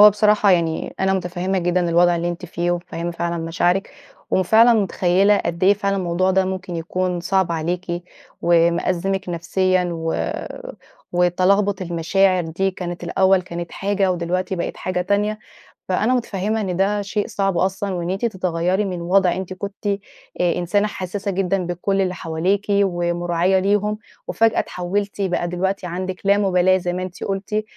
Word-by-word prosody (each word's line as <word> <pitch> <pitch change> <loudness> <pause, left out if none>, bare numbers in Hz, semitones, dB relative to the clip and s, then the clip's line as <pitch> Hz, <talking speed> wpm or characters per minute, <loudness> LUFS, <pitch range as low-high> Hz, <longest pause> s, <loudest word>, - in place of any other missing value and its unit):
هو 210 0 +10
بصراحة 210 0 +3
يعني 165 -3 0
أنا 190 0 +2
مُتفهّمة 185 +1 -1
جدًا 175 0 +1
الوضع 175 +1 +4
اللي 170 +1 -1
أنتِ 175 +1 -5
فيه، 175 +1 -2
ومُتفهّمة 175 -1 -3
فعلًا 170 0 -2
مشاعرِك. 175 +3 0 0.4
وفعلًا 220 +6 +5
مُتخيّلة 195 -1 +3
قد 170 +2 -2
إيه 200 - +6
فعلًا 200 -1 -1
الموضوع 185 0 +1
ده 190 0 +3
ممكن 185 -2 -4
يكون 180 +2 -2
صعب 190 -1 +1
عليكِ، 175 +2 -3 0.4
ومأزمِك 175 +3 +1
نفسيًا، 185 +2 +1
و 165 -1 -2 0.8
وتَلَغبُط 185 +3 +2
المشاعر 180 +2 +2
دي 185 +4 -1
كانت 175 -2 -6
الأول 190 -1 +3
كانت 170 -1 -6
حاجة، 195 -1 0
ودلوقتي 180 +2 -2
بقت 170 - -3
حاجة 185 0 -2
تانية. 205 +3 0 0.5
فأنا 215 +6 +1
مُتفهّمة 215 -2 -1
إن 185 -3 -2
ده 205 +2 +1
شيء 205 +1 -2
صعب 195 -3 -1
أصلًا، 190 +1 -1
وإن 175 0 -3
أنتِ 195 +5 -1
تتغيّري 185 -1 0
من 180 -3 -4
وضع 180 +1 +3
أنتِ 190 0 -5
كنتِ 200 +2 -6 0.5
آآ 175 -1 +2
إنسانة 200 +4 +1
حسّاسة 200 +1 -4
جدًا 190 -1 0
بكل 195 +3 0
اللي 185 -1 0
حواليكِ، 175 +5 -1
ومُراعية 175 -1 +1
ليهم، 205 +2 +1 0.3
وفجأة 225 0 +2
اتحولتِ 200 +3 -3
بقى 180 -2 0
دلوقتي 185 +1 -2
عندِك 185 +1 -4
لامُبالاة 190 -2 +3
زي 175 -1 -3
ما 185 - -3
أنتِ 185 -1 -7
قلتِ. 200 +2 -2
185 Hz, 155 wpm, -21 LUFS, 175-195 Hz, 0.8 s, هو